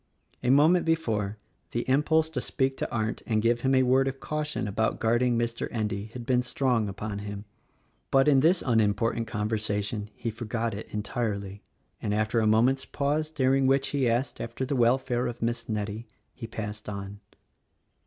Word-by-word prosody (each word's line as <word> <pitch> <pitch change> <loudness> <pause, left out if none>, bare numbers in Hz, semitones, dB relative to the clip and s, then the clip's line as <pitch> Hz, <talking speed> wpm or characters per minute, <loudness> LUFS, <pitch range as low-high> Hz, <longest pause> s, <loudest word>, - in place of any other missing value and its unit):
A 125 - 0
moment 155 +6 +5
before, 110 -11 0 0.4
the 120 +2 -2
impulse 155 +4 +3
to 130 -5 -2
speak 135 +1 0
to - - -2
Arndt 110 -1 -2
and 110 -2 +2
give 115 +2 +2
him 135 +1 +2
a 130 - +5
word 130 +1 +3
of 135 0 -3
caution 150 -5 -3
about 110 +2 0
guarding 120 +1 +2
Mr. 115 0 -1
Endy 105 -3 -2
had 125 -2 -7
been 125 0 +3
strong 125 -4 0
upon 100 +1 -5
him, 100 0 -6 0.6
but 135 +1 +4
in 140 -3 +6
this 165 +6 +3
unimportant 115 -1 +1
conversa 105 -1 -1
tion 105 0 -4
he 115 - -3
forgot 115 0 -3
it 105 - -6
entirely, 105 -2 -3 0.4
and 105 - -1
after 110 +2 +1
a 110 - +2
moment's 120 +5 +3
pause 150 +2 -1
dur 135 -4 +2
ing 135 -1 +3
which 135 0 +2
he 135 -4 +1
asked 120 +3 -1
after 125 +3 -3
the 140 - -1
welfare 125 0 +2
of 120 - -5
Miss 115 0 -2
Nettie, 105 +1 -3 0.3
he 115 - -7
passed 105 -1 -6
on. 100 0 -6
115 Hz, 180 wpm, -27 LUFS, 105-135 Hz, 0.6 s, in